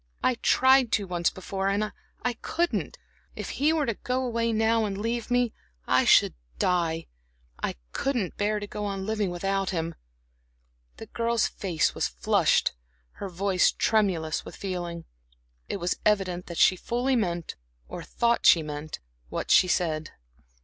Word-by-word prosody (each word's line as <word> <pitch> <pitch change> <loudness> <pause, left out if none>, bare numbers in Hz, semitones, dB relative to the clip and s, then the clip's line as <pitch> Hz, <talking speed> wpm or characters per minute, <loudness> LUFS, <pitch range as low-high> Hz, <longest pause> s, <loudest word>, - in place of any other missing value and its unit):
"I - - +4
tried 260 -2 +5
to 205 - +2
once 175 -2 0
before, 190 +1 -4
and 210 +2 0 0.3
I 245 - +1
couldn't. 340 +8 -2 0.4
If - - -5
he 300 +2 +5
were 315 -2 +1
to 230 - 0
go 255 +4 -2
away 230 -1 0
now 225 +1 +2
and 195 -2 -3
leave 230 +2 -2
me, 245 -2 +2 0.3
I - - +4
I - - -1
should - - +6 0.2
die. 165 -2 0 0.6
I - - -2 0.2
couldn't 245 -10 -1
bear 210 +1 0
to 205 - -5
go 210 +1 -6
on 195 -1 -3
living 215 -2 0
without 195 +2 -1
him." 165 -2 -2 1.0
The - - -8
girl's 230 0 0
face 175 -5 0
was - - 0
flushed, - - +2 0.5
her 200 - -3
voice 185 0 +2
tremulous 185 -8 +1
with - - -10
feeling; 175 -3 -5 0.6
it - - -2
was 175 -1 -2
evident 190 -4 +1
that 170 - -7
she 185 - +5
fully 245 +7 0
meant 175 -7 -1 0.3
or - - -7
thought 235 0 +1
that - - +3
she 165 - +6
meant 150 +1 -6 0.3
what - - -3
she 185 - +6
said. 160 -4 0
200 Hz, 165 wpm, -27 LUFS, 175-230 Hz, 1.0 s, should